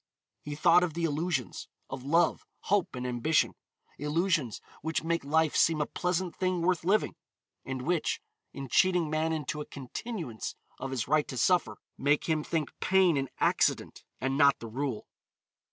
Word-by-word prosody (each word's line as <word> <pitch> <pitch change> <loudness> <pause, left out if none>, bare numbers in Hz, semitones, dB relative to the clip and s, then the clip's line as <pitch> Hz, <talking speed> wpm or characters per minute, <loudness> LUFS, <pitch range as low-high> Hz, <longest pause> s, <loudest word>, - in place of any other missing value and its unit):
He 145 0 -6
thought 170 +3 +5
of 175 -3 -1
the 170 - -2
illusions, 155 -3 -1 0.2
of 130 -1 -7
love, 165 +4 +2 0.2
hope 200 -8 0
and 125 0 -4
ambition, 125 +6 +1 0.5
illusions 150 - 0 0.2
which 160 +1 -2
make 170 -1 0
life 160 +2 +2
seem 165 -2 +4
a 150 - +1
pleasant 180 +1 -2
thing 185 -2 0
worth 180 -1 +1
living, 200 +5 +2 0.5
and 130 -1 -5
which, 170 +1 0 0.3
in 135 -1 -7
cheating 175 +3 +3
man 155 +1 +1
into 150 -1 -3
a - - -5
continuance 140 - -6 0.2
of 135 - -4
his 130 -4 -2
right 150 +2 +2
to 130 - -6
suffer, 120 - +2 0.2
make 145 +2 +2
him 155 -2 0
think 160 -3 -2
pain 190 -3 +4
an 135 -2 -1
accident - - +1 0.2
and 135 +2 -1
not 140 -1 +6
the - - -9
rule. 125 +1 -3
155 Hz, 165 wpm, -29 LUFS, 135-175 Hz, 0.5 s, not